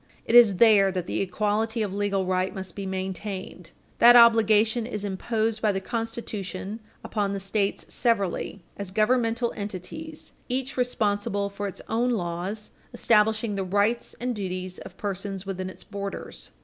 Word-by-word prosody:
It - - -2
is 235 -5 +8
there 200 -2 +6
that 180 -2 -3
the - - -2
equality 215 +4 0
of 200 -2 -3
legal 200 -1 0
right 185 0 0
must 190 -2 -6
be 200 -1 -5
maintained. 190 -2 -5 0.3
That 240 +1 +9
obligation 225 -1 +5
is 210 -3 -4
imposed 220 +3 -1
by 215 - +3
the 195 - -1
Constitution 215 -2 -5 0.2
upon 205 -2 -1
the 200 - -2
States 195 +1 -1
severally 200 -4 0
as 200 -2 -5
governmental 230 +3 +1
entities 260 - -7 0.2
each 260 +1 -2
responsible 205 -5 0
for 200 0 -4
its 195 - -8
own 235 +3 +1
laws 190 0 -3 0.2
establishing 220 0 +3
the 195 -1 -2
rights 205 +5 0
and 245 0 -2
duties 185 -2 -4
of 185 - -11
persons 195 -1 -4
within 185 -1 -4
its - - -11
borders. 200 -2 -6
205 Hz, 150 wpm, -26 LUFS, 190-225 Hz, 0.3 s, That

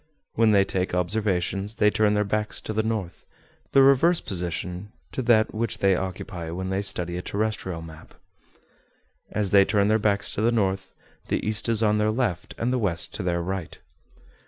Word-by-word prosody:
When 115 -1 +3
they 100 -2 +5
take 95 -1 -1
observations, 95 +2 -1
they 105 -2 +3
turn 105 -1 +2
their 105 - +2
backs 105 +1 -1
to 110 - -5
the 110 - +1
north, 110 -5 -4 0.4
the 135 - +6
reverse 150 +6 +5
position 90 +1 -4 0.2
to - - -3
that 115 -3 +3
which 115 0 -1
they 95 -1 +3
occupy 90 -2 -5
when 95 +3 -4
they 95 +1 0
study 90 -3 -1
a - - -3
terrestrial 100 -5 -3
map. 80 -1 -13 1.1
As 105 -3 -2
they 100 -1 +7
turn 100 +1 +2
their 110 +1 +3
backs 100 -1 0
to - - -3
the 115 +2 +3
north, 95 -4 -1 0.3
the - - -1
east 110 +2 +1
is 115 -1 +2
on 105 0 +2
their 105 0 +2
left, 110 -7 -2
and 125 +2 -1
the 130 - +1
west 90 -7 0
to - - -4
their 85 -2 -1
right. 95 -2 -5
100 Hz, 185 wpm, -25 LUFS, 90-110 Hz, 1.1 s, they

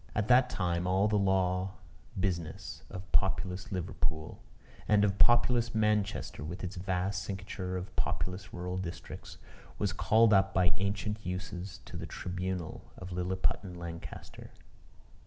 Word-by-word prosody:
At 105 +1 0
that 125 +1 +7
time 90 -4 0
all 95 +3 +4
the 105 - +1
law 95 -1 +2 0.4
business 90 0 -2
of 95 -3 -8
populous 95 +3 +1
Liverpool, 80 -4 -2 0.5
and 105 -1 +5
of 100 -1 +2
populous 120 -1 +5
Manchester, 105 -7 +1
with 85 +6 -5
its 95 +1 -4
vast 95 +2 -1
cincture 95 0 -4
of 90 0 -6
populous 90 0 -2
rural 90 +1 -3
districts, 90 -2 -6 0.4
was - - 0
called 110 0 +5
up 95 0 +4
by 90 -2 +4
ancient 105 +2 -1
usage 90 +1 -5
to - - -7
the - - -5
tribunal 90 -1 -4
of 90 0 -7
Lilliputian 90 +1 -1
Lancaster. 85 -1 -8
95 Hz, 135 wpm, -32 LUFS, 90-100 Hz, 0.5 s, that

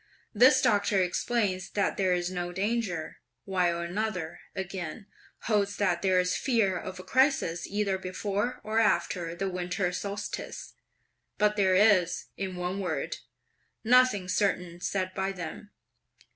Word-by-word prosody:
This 255 +4 +6
doctor 205 -4 +3
explains 185 +1 0
that 200 - 0
there 190 -2 +1
is 175 0 -2
no 175 -1 -3
danger: 195 -4 -2 0.3
while 175 -3 +1
another, 180 -2 -3 0.2
again, 190 0 -5 0.4
holds 200 -2 0
that 185 -4 +1
there's 185 -1 +2
fear 225 -8 +1
of 185 0 -6
a - - -7
crisis 260 - +2
either 200 -2 -1
before 200 +6 -2
or 220 +1 0
after 170 -5 +1
the 195 +2 -2
winter 180 0 -1
solstice; 200 +3 -5 0.6
but 210 0 +3
there 190 -3 +3
is, 185 -4 +4
in 190 -1 -4
one 180 +2 -3
word, 160 -7 -2 0.7
nothing 235 -5 +4
certain 180 -3 0
said 185 -1 -2
by 190 +1 -1
them. 190 +2 -7
190 Hz, 130 wpm, -28 LUFS, 180-210 Hz, 0.7 s, This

